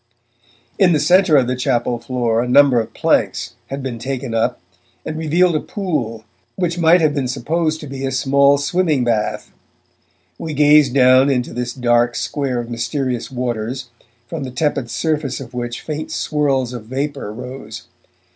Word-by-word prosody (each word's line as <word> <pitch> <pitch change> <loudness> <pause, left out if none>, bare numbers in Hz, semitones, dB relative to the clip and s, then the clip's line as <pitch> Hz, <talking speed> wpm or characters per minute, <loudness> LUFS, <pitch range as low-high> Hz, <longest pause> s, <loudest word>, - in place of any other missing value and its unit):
In 185 -4 +5
the 155 - +2
centre 175 +1 +4
of 130 - +3
the 125 +1 -1
chapel 125 -2 0
floor 115 -1 0
a 125 - -2
number 135 -1 +5
of 110 - -4
planks - - 0
had 135 +1 -5
been 125 -3 -4
taken 130 -1 -4
up 115 0 0 0.5
and 155 - -4
revealed 165 +2 +2
a - - +2
pool 135 - -3 0.3
which 175 -2 -2
might 170 +1 +5
have 155 -2 +3
been 140 -3 -1
supposed 155 +5 -1
to - - -7
be 135 -1 -7
a 135 - -1
small 140 +2 +3
swimming 150 -1 +1
bath. 115 -3 -1 0.9
We 160 -2 -5
gazed 145 -2 +5
down 130 +1 +6
into 125 -3 -1
this 120 0 -3
dark 120 -1 +1
square 135 -4 -2
of 120 - -5
mysterious 125 +1 -2
waters, 125 0 -4 0.3
from 160 +2 -5
the 130 - -5
tepid 140 -1 -1
surface 150 -4 -1
of 130 -2 -10
which 120 -1 -4
faint 155 0 -5
swirls 135 -4 0
of 120 -3 -7
vapour 135 -1 -4
rose. 125 -1 -8
135 Hz, 165 wpm, -19 LUFS, 120-150 Hz, 0.9 s, down